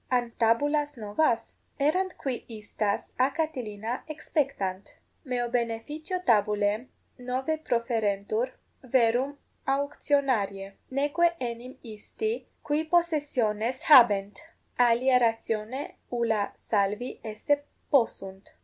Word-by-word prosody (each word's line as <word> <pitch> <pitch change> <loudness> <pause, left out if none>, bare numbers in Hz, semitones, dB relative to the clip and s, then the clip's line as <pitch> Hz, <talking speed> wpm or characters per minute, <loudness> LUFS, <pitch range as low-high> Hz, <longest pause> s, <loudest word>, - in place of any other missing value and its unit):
An 245 -2 +1
tabulas 290 +5 +2
novas? 230 +2 0 0.2
Errant 360 +6 +1
qui 260 -3 -3
istas 210 -2 -3
a 260 +1 +4
Catilina 245 -7 -3
exspectant: 275 -11 -2 0.3
meo 245 -2 -1
beneficio 245 - -2
tabulae 210 +1 +2 0.3
novae 260 +5 -1
proferentur, 230 -3 0 0.3
verum 255 +2 +2 0.3
auctionariae; 270 -8 0 0.2
neque 295 +6 +2
enim 245 +1 -5
isti, 420 - -4 0.2
qui 300 +1 0
possessiones 285 -9 +1
habent, 210 -8 +6 0.4
alia 250 +2 +5
ratione 225 +2 -1 0.2
ulla 225 -4 0
salvi 210 +3 -1
esse 225 +7 0 0.3
possunt. 195 -7 0
245 Hz, 90 wpm, -28 LUFS, 215-285 Hz, 0.4 s, habent